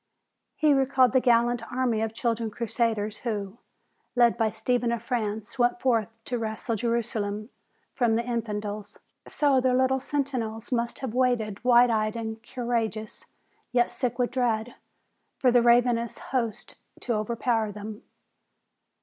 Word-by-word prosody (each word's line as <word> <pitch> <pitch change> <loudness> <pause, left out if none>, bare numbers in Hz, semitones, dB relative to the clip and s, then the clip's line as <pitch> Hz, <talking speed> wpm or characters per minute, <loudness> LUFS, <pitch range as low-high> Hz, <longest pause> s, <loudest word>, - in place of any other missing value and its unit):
He 305 -2 +4
recalled 265 -2 +3
the 260 - +4
gallant 240 -1 +3
army 245 -3 0
of 225 0 -1
children 230 0 -1
crusaders 220 -2 -1
who, 210 -2 -4 0.6
led 240 -1 +5
by 225 -2 +1
Stephen 235 +2 0
of 235 -1 -2
France, 220 -1 -3
went 240 0 +2
forth 230 -5 +2 0.2
to 245 -2 -2
wrest 220 +1 -2
Jerusalem 220 -1 -2 0.4
from 235 -4 +2
the 230 +1 0
infidels. 210 -3 -4 0.3
So 280 -3 +2
their 255 0 +2
little 260 +1 +2
sentinels 255 -5 -3
must 235 -1 -1
have 260 -5 -4
waited 240 -5 0
wide 245 -1 +6
eyed 215 -1 0
and 220 -1 -5
courageous, 230 -3 -3 0.4
yet 240 -1 +2
sick 245 -1 -2
with 245 -1 0
dread, 240 -2 0 0.6
for 255 - +3
the 245 0 +5
ravenous 235 -1 +3
hosts 235 -5 -3 0.3
to 240 - -1
overpower 225 0 0
them. 210 +1 -8
235 Hz, 140 wpm, -27 LUFS, 220-245 Hz, 0.6 s, wide